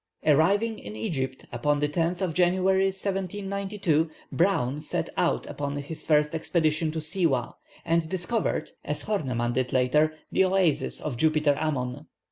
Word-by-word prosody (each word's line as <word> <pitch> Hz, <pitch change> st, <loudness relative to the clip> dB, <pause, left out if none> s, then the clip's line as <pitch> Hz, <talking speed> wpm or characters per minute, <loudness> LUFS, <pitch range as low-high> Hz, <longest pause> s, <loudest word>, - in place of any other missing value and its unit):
Arriving 200 Hz, +9 st, +3 dB
in 105 Hz, +1 st, -8 dB
Egypt 130 Hz, +3 st, -3 dB
upon 145 Hz, +5 st, +1 dB
the 150 Hz, -, +2 dB
10th 170 Hz, +4 st, -1 dB
of 180 Hz, -4 st, 0 dB
January, 185 Hz, +2 st, +3 dB
1792, 195 Hz, -3 st, -1 dB, 0.2 s
Browne 150 Hz, -6 st, +1 dB
set -, -, -3 dB
out -, -, +1 dB
upon 145 Hz, 0 st, -4 dB
his 145 Hz, +3 st, -6 dB
first 150 Hz, 0 st, +2 dB
expedition 160 Hz, -1 st, +1 dB
to 160 Hz, -, -5 dB
Siwâh, 155 Hz, -5 st, 0 dB, 0.3 s
and 165 Hz, -1 st, +1 dB
discovered, 190 Hz, +6 st, -1 dB
as -, -, -3 dB
Horneman 125 Hz, -, -1 dB
did 130 Hz, 0 st, 0 dB
later, 150 Hz, +5 st, +3 dB, 0.2 s
the -, -, +4 dB
oasis 185 Hz, -5 st, +1 dB
of 140 Hz, -6 st, -3 dB
Jupiter 155 Hz, 0 st, +3 dB
Ammon. 140 Hz, -2 st, -2 dB
160 Hz, 140 wpm, -27 LUFS, 145-185 Hz, 0.3 s, the